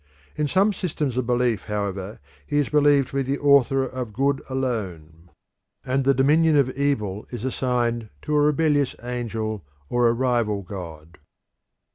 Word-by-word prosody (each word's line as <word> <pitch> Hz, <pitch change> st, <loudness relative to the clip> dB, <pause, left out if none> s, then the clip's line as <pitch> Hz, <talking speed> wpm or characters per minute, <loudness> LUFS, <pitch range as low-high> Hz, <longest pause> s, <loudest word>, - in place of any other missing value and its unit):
In 150 Hz, -1 st, 0 dB
some 195 Hz, +7 st, +2 dB
systems 150 Hz, -9 st, -3 dB
of 125 Hz, -2 st, -1 dB
belief, 120 Hz, -4 st, +1 dB
however, 100 Hz, -1 st, -4 dB, 0.3 s
he 145 Hz, -, -1 dB
is 145 Hz, -, +1 dB
believed 145 Hz, -2 st, +3 dB
to 140 Hz, -, -4 dB
be -, -, +2 dB
the 135 Hz, +1 st, -1 dB
author 140 Hz, -2 st, +4 dB
of 125 Hz, -4 st, -6 dB
good 135 Hz, +3 st, 0 dB
alone, 90 Hz, -11 st, -4 dB, 0.6 s
and 130 Hz, +1 st, 0 dB
the 140 Hz, 0 st, +4 dB
dominion 150 Hz, +4 st, +4 dB
of 135 Hz, -2 st, +3 dB
evil 110 Hz, -8 st, -2 dB
is 120 Hz, -1 st, -6 dB
assigned 120 Hz, -3 st, -1 dB
to 150 Hz, -, -1 dB
a 150 Hz, -, +4 dB
rebellious 145 Hz, -2 st, +2 dB
angel 115 Hz, -4 st, -4 dB, 0.3 s
or 120 Hz, -1 st, +3 dB
a 115 Hz, -, +3 dB
rival 120 Hz, -5 st, 0 dB
god. 85 Hz, -4 st, -9 dB
125 Hz, 155 wpm, -23 LUFS, 110-140 Hz, 0.6 s, author